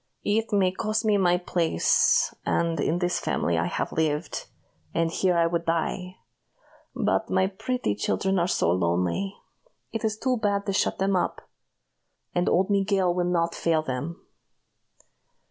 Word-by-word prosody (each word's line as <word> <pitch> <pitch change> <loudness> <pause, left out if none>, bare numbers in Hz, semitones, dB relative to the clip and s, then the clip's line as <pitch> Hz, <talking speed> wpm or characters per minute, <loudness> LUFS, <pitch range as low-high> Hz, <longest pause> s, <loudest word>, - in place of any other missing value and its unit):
"It 220 +2 0
may 195 -3 +3
cost 215 +3 -1
me 210 -1 +3
my 180 -2 +3
place; 170 - +2
and 165 -2 0
in 155 +4 +1
this 175 0 0
family 85 - 0
I 85 - 0
have - - -2
lived, 155 0 -1 0.5
and 165 -1 +1
here 180 0 +1
I 170 - +4
would 170 0 0
die; 180 +2 -1 0.8
but - - 0
my 190 - +3
pretty 220 - -2
children 190 - 0
are 170 - +1
so 85 - +1
lonely, 90 - 0 0.6
it 225 - -4
is 215 -1 0
too 255 +2 0
bad 200 -2 0
to 200 - -1
shut - - +1
them 195 0 +1
up 180 - -2 0.9
and 175 0 +1
old 190 +3 +2
Miguel 195 -2 +2
will 175 0 0
not 170 -1 +1
fail 160 -2 +1
them." 150 +6 -4
180 Hz, 155 wpm, -26 LUFS, 165-200 Hz, 0.9 s, I